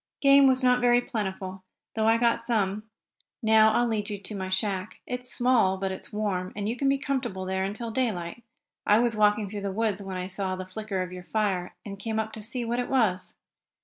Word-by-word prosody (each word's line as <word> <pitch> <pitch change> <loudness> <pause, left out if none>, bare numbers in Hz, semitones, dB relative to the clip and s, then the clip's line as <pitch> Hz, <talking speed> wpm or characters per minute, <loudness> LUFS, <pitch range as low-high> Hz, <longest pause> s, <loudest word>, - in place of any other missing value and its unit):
Game 275 0 +7
was 260 0 +3
not 250 0 +4
very 245 0 +5
plentiful, 190 -6 -4 0.3
though 220 0 +1
I 225 +1 +5
got 235 0 +2
some. 215 -2 -1 0.5
Now 220 0 +6
I'll 240 +2 +2
lead 215 -3 -1
you 205 - -3
to 200 +2 -6
my 190 -1 -4
shack. 190 0 -2
It's 250 0 -5
small, 240 -7 +3
but 190 0 -2
it's 190 - -8
warm, 195 -4 -2
and 205 0 -3
you 230 - -1
can 275 +2 +1
be 275 - +3
comfortable 260 -9 -2
there 190 0 -1
until 215 +4 -3
daylight. 220 -5 -2 0.4
I 210 - +5
was 235 -1 +2
walking 210 0 +3
through 205 +1 -5
the 200 -1 -2
woods, 210 -1 -1
when 190 -1 -5
I 180 - -3
saw 190 0 -3
the 185 0 -6
flicker 195 0 -3
of 180 - -8
your 180 0 -9
fire, 195 -5 -1
and 200 -2 -7
came 220 +1 -3
up 220 0 -2
to 220 - -7
see 235 +3 -4
what 240 +1 -1
it 245 - -2
was." 220 -8 +1
215 Hz, 220 wpm, -27 LUFS, 190-235 Hz, 0.5 s, Game